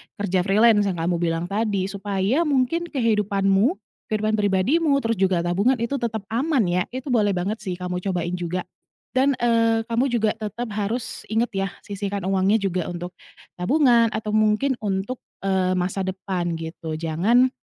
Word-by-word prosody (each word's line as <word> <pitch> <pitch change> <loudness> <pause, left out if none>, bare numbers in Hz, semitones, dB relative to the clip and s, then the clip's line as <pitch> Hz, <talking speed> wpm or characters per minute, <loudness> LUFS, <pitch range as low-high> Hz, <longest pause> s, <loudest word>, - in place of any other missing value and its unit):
kerja 195 -3 0
freelance 210 0 +5
yang 185 - -1
kamu 170 +1 -1
bilang 165 -1 0
tadi, 200 -2 0
supaya 205 - 0
mungkin 295 +5 +1
kehidupanmu, 210 - +2 0.3
kehidupan 215 0 0
pribadimu 245 - +2
terus 225 -3 -1
juga 185 -3 +2
tabungan 195 +9 +2
itu 240 +3 -2
tetap 220 -3 -3
aman 265 +2 +2
ya, 180 +1 +2
itu 260 +1 -4
boleh 205 -5 +2
banget 200 +5 -2
sih 185 -2 -4
kamu 180 0 -4
cobain 180 -2 -2
juga. 175 +1 -2 0.5
Dan, 265 +1 +2
eee, 230 -1 +3
kamu 230 +3 0
juga 225 -4 +1
tetap 220 +2 -4
harus 215 +4 -3
ingat 225 +3 0
ya, 195 -1 -1 0.2
sisihkan 200 -1 -4
uangnya 190 +2 +2
juga 185 -3 -1
untuk 175 0 -5 0.5
tabungan 240 - +4
atau 215 -1 -3
mungkin 215 +5 +2
untuk, 205 +4 -2 0.2
eee, 190 -1 +1
masa 180 +2 -1
depan 185 -2 -3
gitu, 160 0 -6
jangan, 175 +11 +2
205 Hz, 155 wpm, -23 LUFS, 185-235 Hz, 0.5 s, freelance